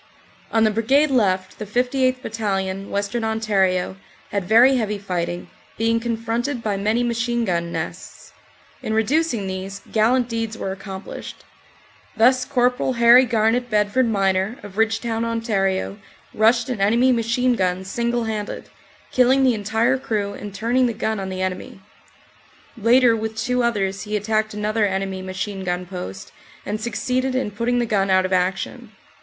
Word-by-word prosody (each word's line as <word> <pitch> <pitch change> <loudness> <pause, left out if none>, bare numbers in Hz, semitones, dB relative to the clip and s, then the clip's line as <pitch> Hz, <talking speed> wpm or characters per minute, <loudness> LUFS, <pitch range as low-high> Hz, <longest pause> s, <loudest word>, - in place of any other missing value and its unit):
On 225 -1 +3
the 215 - +4
Brigade 270 +7 +2
left 190 -7 +1
the 215 - -4
58th. 255 +3 0
Battalion, 195 -3 -2
Western 200 +4 -2
Ontario, 195 -5 0 0.3
had 200 -3 -1
very 240 +7 +6
heavy 210 -3 -1
fighting, 180 -3 -3 0.3
being 230 +1 +2
confronted 230 +2 -2
by 210 -2 0
many 215 +5 0
machine 235 0 0
gun 170 -3 -1
nests. - - -7 0.5
In 220 - -2
reducing 240 0 +1
these 190 +1 -6
gallant 235 +3 +3
deeds 225 -1 -3
were 190 - -3
accomplished. 190 0 -8 0.7
Thus 255 +3 +4
Cpl. 250 -1 +1
Harry 235 +2 +7
Garnet 235 +2 +1
Bedford 215 +4 +2
Miner, 195 +2 +1
of 205 +1 -8
Ridgetown, 225 +1 0
Ont, 205 -4 -1 0.3
rushed 230 +3 +3
an 245 -6 -3
enemy 235 +6 +4
machine 245 +1 +1
gun 185 -3 -1
single 235 +4 -1
handed, 215 -2 -4 0.4
killing 260 +2 +4
the 255 -2 +4
entire 225 +5 +1
crew 205 -5 -2
and 205 0 -8
turning 235 +5 +1
the 235 - -2
gun 220 0 -2
on 190 0 -4
the 185 0 -3
enemy. 185 +1 -4 1.0
Later, 235 +1 +4
with 220 0 -4
two 250 +3 0
others, 195 -5 0
he 210 0 -2
attacked 215 +1 -1
another 210 0 +1
enemy 190 0 -3
machine 190 +1 -5
gun 180 0 -2
post 175 - -7 0.3
and 215 +1 -3
suc 235 0 -4
ceeded 255 +2 -1
in 255 -5 -1
putting 235 +4 -1
the 240 - +1
gun 200 -3 +1
out 185 0 +4
of 185 - -2
action. 190 +5 -1
220 Hz, 155 wpm, -22 LUFS, 195-240 Hz, 1.0 s, Harry